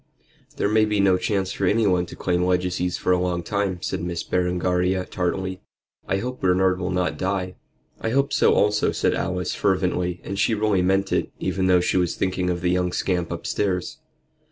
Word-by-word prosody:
"There - - +1
may 110 +1 +3
be 105 -1 0
no 95 -2 +4
chance 95 0 -1
for 100 - -1
anyone 95 -4 +2
to - - -10
claim 90 -1 0
legacies 90 0 0
for - - 0
a 90 - +3
long 90 -1 -1
time," 100 -2 -2
said - - -2
Miss 85 -1 -3
Berengaria, 90 +1 0
tartly. 95 +1 -3 0.5
"I 95 - +1
hope 125 +5 -5
Bernard 95 0 +2
will 90 -1 -2
not 90 -5 -1
die." 95 -1 -1 0.5
"I 115 - -2
hope 140 +4 +1
so - - +4
also," 105 0 +2
said - - +1
Alice, 90 -2 -2
fervently; 90 -2 0
and 100 0 -5
she 110 - +2
really 105 -3 +1
meant 95 +2 +1
it, - - 0
even 95 0 -1
though 90 -1 +5
she 90 - +1
was 90 -2 +1
thinking 90 -1 -1
of 85 -1 -2
the 90 0 +1
young 90 0 +1
scamp 90 -3 -1
upstairs. 95 -3 -2
90 Hz, 190 wpm, -23 LUFS, 90-95 Hz, 0.5 s, though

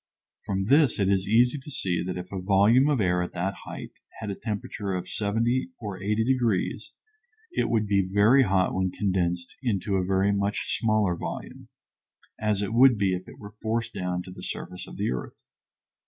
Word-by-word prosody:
From 95 -1 0
this 140 +5 +4
it 100 -1 +2
is 95 -1 +1
easy 125 +6 +4
to 135 - -11
see 90 -11 -1
that 90 0 -4
if 90 0 -7
a 95 -2 -4
volume 105 +8 +4
of 145 -4 +2
air 90 -3 +2
at 90 - -4
that 90 +2 -1
height - - -7 0.3
had 110 -2 -4
a - - -4
temperature 105 -2 -4
of 90 0 -4
70 115 - 0
or 100 -3 -6
80 105 +3 +1
degrees 120 -7 0 0.6
it - - 0
would 110 -2 +2
be 100 -2 +1
very 105 +7 +5
hot 95 -6 +2
when 95 0 0
condensed 90 -3 -1
into 100 -5 0
a 95 - +1
very 95 +2 +2
much 100 +1 0
smaller 110 -5 +2
volume, - - -7 0.7
as 105 -1 0
it 100 - -3
would 125 0 +6
be 100 -2 +1
if 90 0 -4
it - - -12
were 105 0 -11
forced 115 +1 -1
down 90 -1 -2
to 90 - -10
the - - -10
surface 90 - -6
of - - -10
the - - 0
earth. 65 - -6
100 Hz, 195 wpm, -26 LUFS, 95-115 Hz, 0.7 s, would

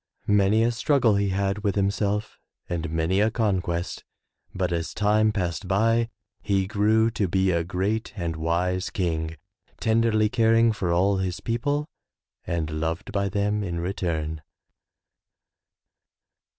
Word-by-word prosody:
Many 105 +2 +3
a 120 - +2
struggle 120 -1 +2
he 100 0 +1
had 100 +1 0
with 100 -1 -1
himself 100 +1 -1 0.3
and 85 -1 -3
many 80 +4 0
a 110 - +3
conquest, 95 -6 -1 0.5
but 90 -2 -2
as 85 -1 -3
time 105 +1 +3
passed 90 -5 -3
by 115 +4 +2 0.3
he 95 -2 +1
grew 110 +3 +2
to 105 -3 0
be 95 +2 +2
a 85 -1 +1
great 100 +6 -2
and 85 -4 -3
wise 90 +4 -1
king, 80 -3 -2 0.4
tenderly 110 -1 +2
caring 115 0 +3
for 100 -5 -2
all 95 +3 +2
his 95 -1 -2
people 145 +6 -1 0.6
and 85 -3 -2
loved 80 +1 -3
by 100 -1 0
them 105 +1 0
in 85 -3 -3
return. 80 -4 -2
100 Hz, 135 wpm, -25 LUFS, 85-110 Hz, 0.6 s, Many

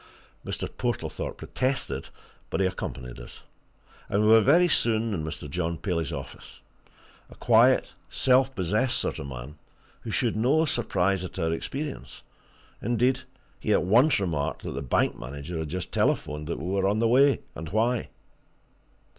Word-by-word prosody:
Mr. - - -3
Portlethorpe - - -3
protested 130 +1 -2 0.4
but - - -2
he 95 - +3
accompanied 65 -9 -5
us. - - -11 0.7
And 100 +2 +2
we 105 - +4
were 110 0 +8
very 170 +9 +5
soon 115 -7 +2
in 80 -5 -2
Mr. 75 -1 -5
John 85 +3 -2
Paley's 85 -5 -2
office 70 -1 -9 0.7
a - - -14
quiet, - - +4 0.2
self 130 +1 +3
possessed 105 +7 +1
sort - - -2
of 70 - -6
man 65 +3 -8 0.4
who - - -8
showed 115 +1 0
no 135 +9 +3
surprise 100 - 0
at 90 - -7
our 80 -2 0
appearance; 140 - -5 0.6
indeed, 125 +3 +2 0.4
he - - +1
at - - +3
once 120 - +4
remarked 80 -7 -2
that - - -4
the 70 - -4
bank 65 - 0
manager 70 +6 -6
had 80 -2 -4
just 90 0 -4
telephoned 75 0 0
that 85 - -2
we 75 - -6
were 95 0 +1
on 100 +2 +1
the 115 +1 +2
way, 135 +4 +4
and 80 -1 -7
why. 115 +4 0
95 Hz, 160 wpm, -27 LUFS, 80-120 Hz, 0.7 s, were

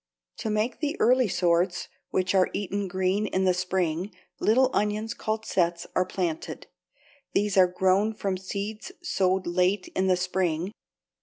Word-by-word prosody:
To 220 - -3
make 215 +3 0
the 300 0 -2
early 250 0 +4
sorts, 180 0 +1 0.2
which 185 0 0
are 190 -1 +4
eaten 200 0 -2
green 190 +3 0
in 190 -1 0
the 185 - +4
spring, 180 0 -1 0.3
little 255 +4 +4
onions 210 +2 0
called 220 0 -3
sets 170 -2 0
are 185 - +2
planted. 175 -4 -3 0.7
These 205 0 +1
are 185 -1 +7
grown 190 +4 +2
from 195 -2 -1
seeds 200 - -5
sowed 190 - +1
late 185 +2 +1
in 190 0 +1
the 185 -1 +3
spring. 180 -1 -1
190 Hz, 150 wpm, -27 LUFS, 180-210 Hz, 0.7 s, are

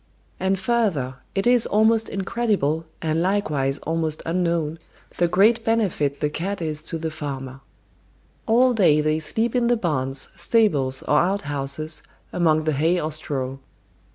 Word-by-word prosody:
And 190 +1 +1
further, 190 - 0 0.2
it 195 - 0
is 245 -1 +4
almost 220 +2 +3
incredible, 195 -7 -1 0.2
and 160 0 0
likewise 155 -8 0
almost 160 -1 -1
unknown, 165 -2 -1 0.4
the 175 - +4
great 210 +7 +3
benefit 195 -11 0
the 150 - +1
cat 190 +6 -3
is 155 -2 -3
to 165 - -4
the 160 0 -4
farmer. 135 -3 -6 0.9
All 245 +3 +4
day 180 -9 +4
they 155 +1 +1
sleep 225 +9 -1
in 240 -1 +2
the 240 0 +3
barns, 135 - -2
stables, 145 - +2
or 150 - +3
outhouses, 155 -4 -1 0.3
among 155 -3 +2
the 155 0 0
hay 165 +6 +2
or 155 0 -2
straw. 135 -4 -3
165 Hz, 145 wpm, -23 LUFS, 150-205 Hz, 0.9 s, is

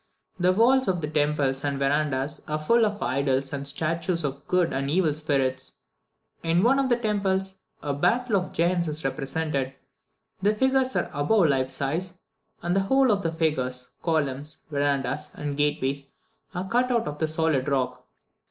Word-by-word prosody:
The 180 +1 +4
walls 245 +6 +4
of 185 -2 +1
the 150 - -3
temples 145 -3 +1
and 140 -1 -1
verandahs 140 0 0
are 155 0 -1
full 225 +9 +3
of 205 0 -4
idols 135 0 0
and 140 0 -3
statues 165 +4 -1
of 140 -1 -4
good 180 -2 +2
and 135 +1 -1
evil 160 -1 +2
spirits. 135 -3 -1 0.7
In 170 +2 +2
one 265 +4 +4
of 270 -1 +1
the 240 - +5
temples, 195 -4 0 0.3
a 145 -1 -1
battle 230 - +1
of 180 - -3
giants 170 0 +1
is 155 -1 -3
represented. 135 0 -2 0.7
The 205 +2 +3
figures 265 +2 +2
are - - 0
above 160 +4 +3
life 130 -2 +1
size, 165 +8 -2 0.5
and 175 +1 0
the - - +4
whole 265 +6 +3
of 200 -1 +1
the 165 - -1
figures, 130 -6 -1
columns, 150 -2 -1
verandahs 140 -1 0
and 145 -1 -4
gateways, 140 -1 0 0.5
are 180 +2 -3
cut 245 +4 +2
out 235 -7 +1
of 145 0 -5
the 160 - +2
solid 155 -4 +1
rock. 135 -2 -1
155 Hz, 170 wpm, -26 LUFS, 140-190 Hz, 0.7 s, the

